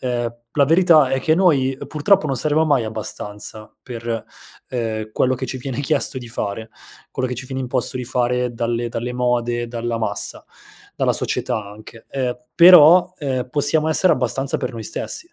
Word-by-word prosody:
ehm, 120 -2 -2 0.2
la 145 - +4
verità 165 -3 +5
è 135 - 0
che 155 - +2
noi, 150 -8 +2
ehm, 135 - -9
purtroppo 160 +3 +2
non 135 -3 -1
saremo 155 +4 +1
mai 140 -6 +2
abbastanza 110 -1 -6
per, 115 -2 -5 0.4
ehm, 110 -3 -3
quello 130 0 +1
che 130 +1 -5
ci 130 - -5
viene 130 0 -5
chiesto 145 -1 0
di 120 -2 -10
fare 110 -1 -5 0.4
quello 130 0 -3
che 125 - -3
ci 130 +2 -8
viene 130 0 -4
imposto 125 0 -1
di 125 - -4
fare 125 0 -1
dalle 120 0 -2
dalle 120 +2 -4
mode, 120 -1 -1
dalla 115 0 -3
massa, 105 -2 -3 0.5
dalla - - +1
società 115 -4 -2
anche. 110 +2 -13
Ehm, 130 -3 -2 0.2
però, 175 0 +7
ehm, 130 -4 -3
possiamo 150 +3 +3
essere 165 +2 +3
abbastanza 135 +1 -1
per 125 -1 -4
noi 115 -1 -7
stessi, 340 - -1
125 Hz, 175 wpm, -20 LUFS, 115-145 Hz, 0.5 s, però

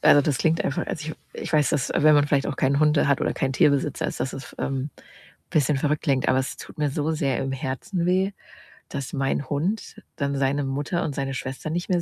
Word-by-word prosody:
also 145 - +7
das 140 -2 0
klingt 160 0 +2
einfach, 145 - -1
als 160 - -4
ich 155 +1 -4 0.2
ich - - -5
weiß, 150 -2 +4
dass 140 -4 0
wenn 155 0 +6
man 145 0 +4
vielleicht 140 -1 +2
auch 145 - -3
keine 140 +2 +2
Hunde 150 -1 +4
hat 140 - +3
oder - - 0
keinen 135 0 0
Tierbesitzer 140 +1 +2
ist, - - -5
dass 130 - -1
es, 135 - -9
ähm, 135 +1 -2 0.6
bisschen 150 -1 +2
verrückt 150 +2 0
klingt, 135 -5 +1
aber 130 - +4
es 130 - -2
tut - - -11
mir 150 -1 +1
so 150 +2 -1
sehr 140 -5 0
im 135 - -2
Herzen 135 - -2
weh, 185 +2 +2 0.6
dass 140 -2 -5
mein 135 0 -1
Hund 175 +10 -2 0.2
dann 140 -1 -1
seine 140 +1 +1
Mutter 145 +6 -1
und 145 - -3
seine 135 -1 -2
Schwester 135 +3 -5
nicht 175 +3 -2
mehr 180 -2 +2
145 Hz, 230 wpm, -25 LUFS, 135-155 Hz, 0.6 s, also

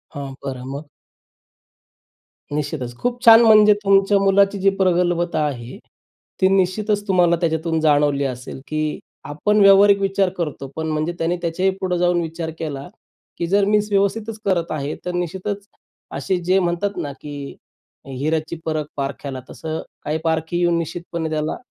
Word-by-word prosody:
हां, 140 -1 -6
बरं 130 -2 -5
मग? 145 +2 -7 1.7
निश्चितच 145 -4 -3
खूप 245 - -2
छान 225 0 +9
म्हणजे 215 -2 +7
तुमच्या 195 0 +4
मुलाची 195 +1 +3
जी 195 +1 +4
प्रगल्भता 175 -2 +1
आहे 125 -4 -5 0.6
ती 190 - +6
निश्चितच 205 +2 +1
तुम्हाला 175 -3 +4
त्याच्यातून 160 -1 0
जाणवली 145 -2 +3
असेल 125 0 -6
की 155 0 -2 0.2
आपण 180 +9 0
व्यावहारिक 200 0 +7
विचार 195 -1 +1
करतो. 150 -5 -4
पण 160 0 -3
म्हणजे 155 +2 -1
त्याने 170 +2 0
त्याच्याही 180 +3 0
पुढं 180 -2 0
जाऊन 175 0 +2
विचार 165 0 -4
केला 140 -4 -5 0.5
की 170 - -2
जर 200 +3 +3
मीन्स 210 +1 +2
व्यवस्थितच 210 +2 0
करत 175 -4 0
आहे 145 -1 -3
तर 180 - -2
निश्चितच 190 +3 -3 0.5
असे 190 - -1
जे 185 +2 +3
म्हणतात 180 +3 -1
ना, 145 - -3
की 145 -2 -7 0.5
हिऱ्याची 155 +5 -2
परख 155 -2 -1
पारख्याला 135 -1 -4
तसं 160 0 -5 0.2
काही 150 +1 -1
पारखी 160 +1 -1
येऊन 175 -1 +2
निश्चितपणे 170 0 -4
त्याला 155 0 -2
170 Hz, 145 wpm, -21 LUFS, 155-195 Hz, 1.7 s, छान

